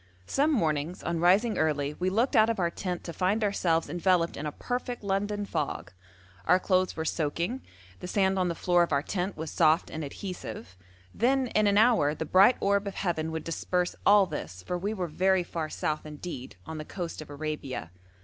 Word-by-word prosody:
Some 290 Hz, -, +2 dB
mornings 160 Hz, -, 0 dB
on 170 Hz, -1 st, -1 dB
rising 195 Hz, +7 st, +3 dB
early 145 Hz, -2 st, 0 dB
we 180 Hz, +4 st, -1 dB
looked 235 Hz, +8 st, +1 dB
out 220 Hz, 0 st, +6 dB
of 230 Hz, -, 0 dB
our 170 Hz, -2 st, +1 dB
tent 180 Hz, -1 st, -4 dB
to 170 Hz, -, -6 dB
find 195 Hz, +5 st, +1 dB
ourselves 175 Hz, -5 st, +1 dB
enveloped 175 Hz, -1 st, +1 dB
in 150 Hz, -, -4 dB
a -, -, -3 dB
perfect 245 Hz, -, -4 dB
London 205 Hz, +1 st, -1 dB
fog 145 Hz, -, -3 dB, 0.5 s
our 180 Hz, -, +5 dB
clothes 185 Hz, -1 st, +1 dB
were 160 Hz, -, -2 dB
soaking, 170 Hz, -, -1 dB, 0.4 s
the -, -, -6 dB
sand 190 Hz, 0 st, +1 dB
on 180 Hz, -, +2 dB
the 170 Hz, -, -2 dB
floor 175 Hz, 0 st, +2 dB
of 170 Hz, -, +1 dB
our 140 Hz, 0 st, +2 dB
tent 185 Hz, +3 st, -3 dB
was 160 Hz, -1 st, -5 dB
soft 160 Hz, 0 st, +3 dB
and 155 Hz, -, -4 dB
adhesive; 140 Hz, -, -7 dB, 0.4 s
then 260 Hz, +2 st, +2 dB
in 215 Hz, -1 st, +2 dB
an 200 Hz, 0 st, +3 dB
hour 210 Hz, -10 st, +4 dB
the 160 Hz, -, -4 dB
bright 195 Hz, +9 st, +5 dB
orb 200 Hz, 0 st, +1 dB
of 195 Hz, -, -5 dB
heaven 160 Hz, -4 st, -1 dB
would 160 Hz, 0 st, -4 dB
disperse 180 Hz, +2 st, -1 dB
all 205 Hz, -1 st, +6 dB
this, 90 Hz, -, -7 dB
for 180 Hz, -, -3 dB
we 195 Hz, +4 st, -2 dB
were 190 Hz, -5 st, -2 dB
very 185 Hz, +3 st, +2 dB
far 165 Hz, -2 st, -4 dB
south 155 Hz, 0 st, -2 dB
indeed, 150 Hz, -, -7 dB
on 160 Hz, -1 st, -6 dB
the -, -, -4 dB
coast 170 Hz, 0 st, -6 dB
of 155 Hz, -, -10 dB
Arabia. 145 Hz, -, -5 dB
180 Hz, 200 wpm, -28 LUFS, 155-200 Hz, 0.5 s, out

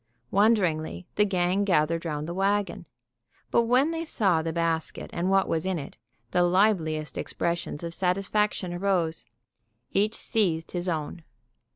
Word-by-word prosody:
Wonderingly, 185 Hz, -6 st, +2 dB
the 210 Hz, -, +3 dB
gang 185 Hz, 0 st, +1 dB
gathered 165 Hz, -3 st, +1 dB
round 150 Hz, -1 st, -3 dB
the 170 Hz, -, -4 dB
wagon. 195 Hz, -1 st, 0 dB, 0.6 s
But 235 Hz, -, +3 dB
when 255 Hz, +7 st, +3 dB
they 330 Hz, 0 st, -3 dB
saw 195 Hz, -, +1 dB
the 165 Hz, 0 st, -2 dB
basket 165 Hz, -1 st, -1 dB
and 175 Hz, +2 st, -1 dB
what 195 Hz, 0 st, +3 dB
was 160 Hz, -, 0 dB
in 190 Hz, -1 st, -1 dB
it, 140 Hz, -, -7 dB, 0.4 s
the 180 Hz, -, +3 dB
liveliest 175 Hz, -4 st, +2 dB
expressions 170 Hz, -2 st, -2 dB
of 170 Hz, 0 st, -4 dB
satisfaction 195 Hz, +1 st, 0 dB
arose. 175 Hz, -3 st, -1 dB, 0.6 s
Each 210 Hz, +3 st, +1 dB
seized 170 Hz, -7 st, 0 dB
his 175 Hz, 0 st, -2 dB
own. 160 Hz, +1 st, -3 dB
180 Hz, 145 wpm, -27 LUFS, 165-200 Hz, 0.6 s, the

